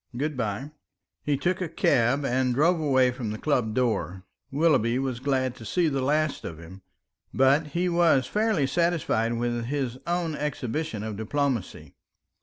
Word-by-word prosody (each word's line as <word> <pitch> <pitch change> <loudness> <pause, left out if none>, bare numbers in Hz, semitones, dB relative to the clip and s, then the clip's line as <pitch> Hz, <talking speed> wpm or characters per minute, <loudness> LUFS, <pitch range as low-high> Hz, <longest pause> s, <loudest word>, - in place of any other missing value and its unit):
Good 150 +3 -2
bye." 120 +4 -3 0.5
He 145 -2 0
took 180 +6 -1
a 175 - -2
cab 135 +1 +2
and 125 -1 +1
drove 165 +5 +3
away 130 -4 +3
from 120 -3 -5
the 110 - -4
club 120 -6 0
door. 110 -7 -1 0.3
Willoughby 135 -6 +2
was 130 -3 -2
glad 130 -1 0
to - - -11
see 165 - +1
the 135 -2 -1
last 150 +2 0
of 80 - -6
him, 90 +3 -12 0.5
but 135 +4 +4
he 180 +1 +1
was 170 -7 +3
fairly 210 - +1
satisfied 145 -7 +1
with 120 0 -2
his 130 -1 -3
own 170 -2 -1
exhibition 150 -4 -3
of 110 -2 -5
diplomacy. 130 0 -2
135 Hz, 160 wpm, -26 LUFS, 120-155 Hz, 0.5 s, but